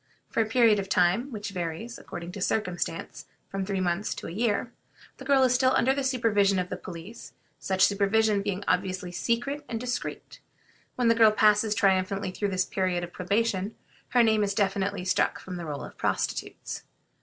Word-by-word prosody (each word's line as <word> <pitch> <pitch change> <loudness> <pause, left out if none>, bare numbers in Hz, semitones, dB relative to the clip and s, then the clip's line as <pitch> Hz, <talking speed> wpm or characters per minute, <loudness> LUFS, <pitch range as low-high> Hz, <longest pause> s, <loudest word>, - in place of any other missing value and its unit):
For - - +2
a 220 - 0
period 225 -2 +4
of 195 -1 -4
time, 185 +10 +2
which 210 -3 -5
varies, 180 +6 -5
according 175 0 -7
to 195 - -8
circumstances, 180 -5 -2 0.2
from 195 0 -3
three 195 0 -2
months 185 +2 -1
to - - -8
a - - -5
year, 225 +4 0 0.5
the 265 - -10
girl 270 -1 +4
is 255 -1 +4
still 260 +1 +3
under 265 +2 +3
the 275 0 -2
supervision 220 -7 +2
of 180 -1 -1
the - - -3
police, 180 +5 -10 0.3
such 190 -1 +1
supervision 205 +1 +2
being 200 -1 -3
obviously 185 -1 0
secret 240 - -1
and 230 - -3
discreet. 245 +1 -5 0.6
When 245 -2 +1
the 230 - +6
girl 225 -1 +6
passes 210 0 +3
triumphantly 190 0 +1
through 205 +2 -2
this 185 -1 0
period 185 -2 -1
of 175 - -7
probation, 200 +1 -1 0.3
her 245 -1 +4
name 220 -2 +3
is 200 -1 -1
definitely 195 -1 0
struck 185 - +1
from 185 -1 -7
the 170 -2 -6
roll 145 -2 -4
of - - -10
prostitutes. - - -2
200 Hz, 185 wpm, -27 LUFS, 185-230 Hz, 0.6 s, the